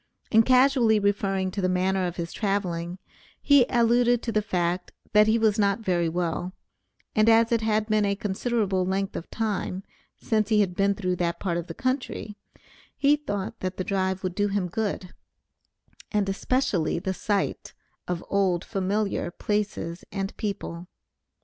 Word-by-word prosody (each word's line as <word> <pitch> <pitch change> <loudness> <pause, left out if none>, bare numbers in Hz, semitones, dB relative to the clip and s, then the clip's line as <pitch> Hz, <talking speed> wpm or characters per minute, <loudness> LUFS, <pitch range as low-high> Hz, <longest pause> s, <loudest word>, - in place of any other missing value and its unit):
In 225 - +7
casually 250 -2 +4
referring 195 -2 0
to 200 - -3
the 185 - +1
manner 185 0 +1
of 175 - -5
his 170 -1 -5
traveling, 180 -4 -2 0.4
he 280 -4 +5
alluded 240 0 +3
to 230 - -2
the 215 - +2
fact, 180 -3 -1 0.2
that 210 0 +6
he 220 +1 +4
was 220 -1 +2
not 200 +1 +2
very 175 -5 +1
well, 175 +1 -2 0.6
and 215 +1 +4
as 230 +1 +5
it 230 -1 +2
had 215 -1 +1
been 215 -1 +2
a 200 0 +1
considerable 200 -1 -1
length 190 +1 -1
of 165 - -6
time 200 -4 -2 0.3
since 215 -1 0
he 215 -2 +4
had 185 -3 0
been 200 +2 +2
through 185 -3 -1
that 170 -1 -1
part 175 -3 -1
of 175 0 -4
the - - -7
country, 255 -5 -3 0.6
he 285 +1 +4
thought 205 -7 -4
that 185 0 -4
the 185 - -1
drive 190 0 -1
would 185 -1 -2
do 205 +2 +1
him 195 -3 -1
good, 195 -2 -3 1.0
and 210 -2 +1
especially 195 - 0
the 190 +2 -2
sight 200 +1 -2 0.3
of 180 -1 -3
old 190 -3 +1
familiar 195 -2 -1
places 195 -3 -3
and 195 -1 -3
people. 185 -4 -5
200 Hz, 165 wpm, -26 LUFS, 185-220 Hz, 1.0 s, In